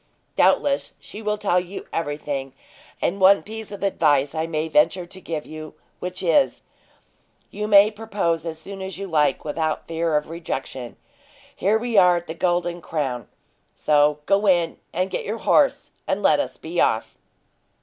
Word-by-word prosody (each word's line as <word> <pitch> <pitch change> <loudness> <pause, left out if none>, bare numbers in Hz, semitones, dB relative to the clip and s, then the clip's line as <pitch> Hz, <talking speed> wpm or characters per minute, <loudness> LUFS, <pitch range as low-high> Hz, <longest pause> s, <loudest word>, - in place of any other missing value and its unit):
Doubtless, 280 -1 +2
she 210 - -10
will 210 -1 -1
tell 195 -4 +2
you 180 +2 -7
everything, 145 -4 -3 0.5
and 195 +3 0
one 195 +1 +6
piece 220 0 -8
of 200 - -7
advice 145 -7 +2
I 160 0 -2
may 155 -1 -2
venture 160 +3 +2
to 190 +2 -11
give 160 -3 -4
you, 155 0 -9 0.2
which 180 +1 -5
is, 270 - +2 0.9
you 210 0 -3
may 205 0 +7
propose 205 -7 -2
as 165 -1 -5
soon 195 +4 -9
as 190 -1 -5
you 200 - -5
like 150 -6 +1
without 155 +1 -2
fear 165 -1 0
of 150 - -2
rejection. 135 -6 -5 0.6
Here 205 +4 +2
we 235 -1 -1
are 180 -2 +6
at 170 - -5
the 160 - -6
Golden 175 0 -1
Crown, 135 -9 -3 0.5
so 150 0 +3
go 200 +1 +2
in 175 -3 +2
and 185 +2 -1
get - - -2
your 215 +3 -3
horse, 275 +4 +2 0.2
and - - -1
let - - +4
us - - -3
be - - -2
off." - - +1
175 Hz, 170 wpm, -23 LUFS, 155-200 Hz, 0.9 s, may